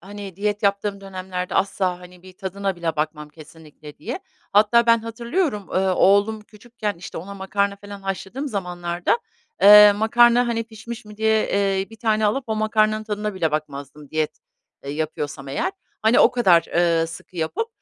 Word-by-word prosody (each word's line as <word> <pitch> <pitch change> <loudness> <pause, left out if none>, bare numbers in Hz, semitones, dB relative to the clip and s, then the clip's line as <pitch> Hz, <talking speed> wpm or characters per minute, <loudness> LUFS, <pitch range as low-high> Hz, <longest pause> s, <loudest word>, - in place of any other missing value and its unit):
hani, 195 -1 -9
diyet 205 +1 -2
yaptığım 200 0 0
dönemlerde 185 -1 -5
asla, 185 -2 0
hani, 180 0 -15
bir 185 0 -13
tadına 195 +1 -4
bile 165 -2 -3
bakmam 150 0 -3
kesinlikle 155 -1 -14
diye. - - -5 0.3
Hatta 220 +3 +4
ben 230 0 +5
hatırlıyorum, 230 - -2
ııı, 190 0 +1
oğlum 200 +4 +3
küçükken, 215 0 -6
işte, 175 - -8
ona 200 +4 -8
makarna 200 +1 -1
falan 200 0 -11
haşladığım 195 +8 -4
zamanlarda, 175 - -2 0.4
eee, 210 0 +10
makarna, 240 +3 +4
hani, 230 -1 -1
pişmiş 225 +1 -9
mi 210 0 -13
diye, 220 0 +2
eee, 195 0 0
1 225 - -12
tane 220 -2 +1
alıp 255 +6 0
o 220 -1 -2
makarnanın 215 0 +1
tadına 210 -1 -3
bile 165 -4 0
bakmazdım 145 -1 -6
diyet, 155 -1 -2 0.5
ııı, 140 - -4
yapıyorsam 145 -2 -4
eğer. 355 - -2 0.3
Hani, 220 +2 +4
o 240 - +6
kadar, 190 -9 +4
ııı, 170 -1 +3
sıkı 165 +2 -11
yapıp 170 - -2
200 Hz, 165 wpm, -22 LUFS, 175-215 Hz, 0.5 s, eee